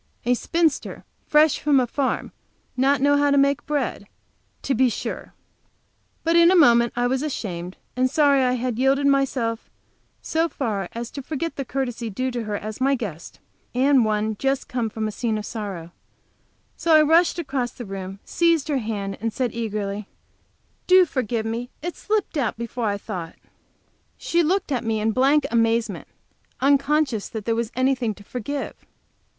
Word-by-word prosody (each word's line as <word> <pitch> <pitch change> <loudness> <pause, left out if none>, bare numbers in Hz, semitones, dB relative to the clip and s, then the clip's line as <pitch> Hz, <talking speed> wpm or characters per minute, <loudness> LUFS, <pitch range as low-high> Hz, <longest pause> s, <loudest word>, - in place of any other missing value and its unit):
A 245 - +3
spinster 325 +4 -1 0.2
fresh 300 0 +4
from 290 -2 +3
a 255 - +2
farm 265 +2 -2 0.4
not 270 +1 +2
know 285 +1 +4
how 285 0 +3
make 280 0 +3
bread, 275 -8 -2 0.6
to 275 - 0
be 260 -1 +3
sure! - - -5 0.9
But 330 +1 +2
in 340 0 +7
a 375 - +4
moment 235 -8 +5
I 245 0 +1
was 260 +2 0
ashamed 185 - -4 0.2
and 255 +1 +2
sorry 285 -1 +4
that 260 - +3
I - - +1
had 250 -1 -2
yielded 270 +2 +3
to 280 - +4
myself 250 -4 0 0.5
so 325 +1 0
far 210 - -3
as 235 0 -5
to 280 - -6
forget 315 +4 -4
the 275 - -3
courtesy 245 -3 -3
due 255 +6 -2
to 240 -2 -4
her 210 -1 -3
as 215 +4 -7
my 275 +1 +3
guest, 200 - -7 0.4
and 265 0 +4
one 215 0 0
just 270 0 -1
home 240 -3 -1
from 215 0 -3
a - - -3
scene 220 0 -1
of 210 - -5
sorrow, 195 -7 -6 0.8
so 330 -1 +3
I 310 - +7
rushed 330 +4 +4
across 270 -7 -2
the 240 0 -9
room, 195 -1 -6
seized 335 -3 +2
her 280 -3 +1
hand, 205 -4 -4
and 225 0 -1
said, 245 0 -2
eagerly: 210 -3 -3 0.8
"Do 370 0 +7
forgive 240 -7 -2
me! 230 +2 -3
It 350 +1 -3
slipped 420 -6 -1
out 245 -7 -1
before 235 0 -3
I 205 0 0
thought!" 185 -5 -6 0.8
She 345 - +1
looked 350 0 0
at 250 -4 0
me 225 -1 0
in 220 +1 +1
blank 275 +4 +3
amazement, 230 -4 +1 0.5
unconscious 280 -3 +2
that 220 -2 -6
there 230 - +1
was 230 0 -2
anything 255 -4 +1
to 205 - -14
forgive. 255 +6 -5
250 Hz, 175 wpm, -23 LUFS, 220-280 Hz, 0.9 s, in